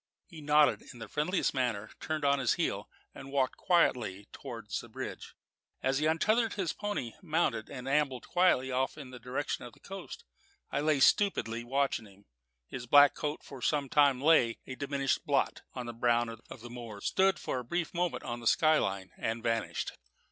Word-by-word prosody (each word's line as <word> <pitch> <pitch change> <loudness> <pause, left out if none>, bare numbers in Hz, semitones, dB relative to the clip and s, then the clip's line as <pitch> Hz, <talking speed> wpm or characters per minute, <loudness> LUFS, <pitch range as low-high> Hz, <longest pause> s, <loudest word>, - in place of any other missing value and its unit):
He 165 -4 -12
nodded 150 0 +4
in 125 - -13
the 115 -1 -8
friendliest 155 - 0
manner, 120 -6 -1
turned 155 -2 -2
on 140 0 +3
his 130 -3 +2
heel, - - -2 0.2
and 135 - -10
walked 135 -2 +1
quietly 120 - +2
towards - - -6
the - - -13
bridge. - - -7 0.5
As 135 +1 +2
he 155 - +2
untethered 215 +8 +2
his 190 -5 -1
pony, 205 - -3
mounted, 160 - 0
and 125 -1 -7
ambled 135 -2 0
quietly 175 -8 +3
off 130 +3 0
in 135 -4 -9
the 125 - -9
direction 130 +4 -3
of 120 -2 -9
the - - -20
coast, 195 -1 -9 0.5
I - - 0
lay 150 -2 +2
stupidly 120 - +3
watching 135 -3 0
him. 100 0 -20 0.4
His 125 - -7
black 145 +3 +7
coat 150 0 -4
for 135 -3 -10
some 145 -1 0
time 140 -3 +4
lay, 135 -6 +4
a 130 - -6
diminishing 140 0 -1
blot, 145 -5 0
on 125 -2 -4
the 120 - -5
brown 120 0 +2
of 115 0 -10
the 120 - -9
moors, 115 -4 -8
stood 190 -1 +3
for 130 - -3
a - - -6
brief 170 +7 -2
moment 175 -1 -1
on 120 0 -4
the 115 - -3
sky 155 +4 +5
line, 95 -1 -2
and 115 +1 -2
vanished. 115 -1 -1
135 Hz, 190 wpm, -31 LUFS, 120-155 Hz, 0.5 s, black